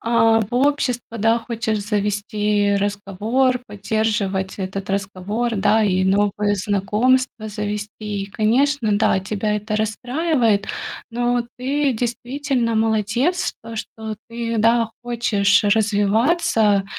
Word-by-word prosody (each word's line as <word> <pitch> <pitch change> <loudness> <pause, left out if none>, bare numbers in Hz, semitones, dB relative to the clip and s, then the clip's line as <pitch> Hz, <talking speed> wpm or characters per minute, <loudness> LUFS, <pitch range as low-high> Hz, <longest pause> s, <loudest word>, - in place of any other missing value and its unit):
а, 225 -1 +3
в 220 +3 -4
общество, 250 -4 0
да, 225 +2 +3
хочешь 225 -2 -2
завести 205 0 0
разговор, 205 +6 0
поддерживать 200 -2 -1
этот 190 +1 -4
разговор, 200 +4 -2
да, 215 +3 +3
и 185 -2 +2
новые 205 +1 +2
знакомства 215 +4 0
завести. 210 0 -4 0.2
И 195 - -5
конечно, 230 0 +2
да, 215 -3 +2
тебя 210 +2 -1
это 210 +1 -3
расстраивает, 235 0 0 0.4
но 240 +1 0
ты 275 +2 0
действительно 245 0 -1
молодец, 225 - +1
то 230 0 -8
что 220 0 -6
ты, 230 -1 -3
да, 230 +1 +3
хочешь 215 -4 +2
развиваться, 210 - +2
220 Hz, 110 wpm, -21 LUFS, 205-240 Hz, 0.4 s, а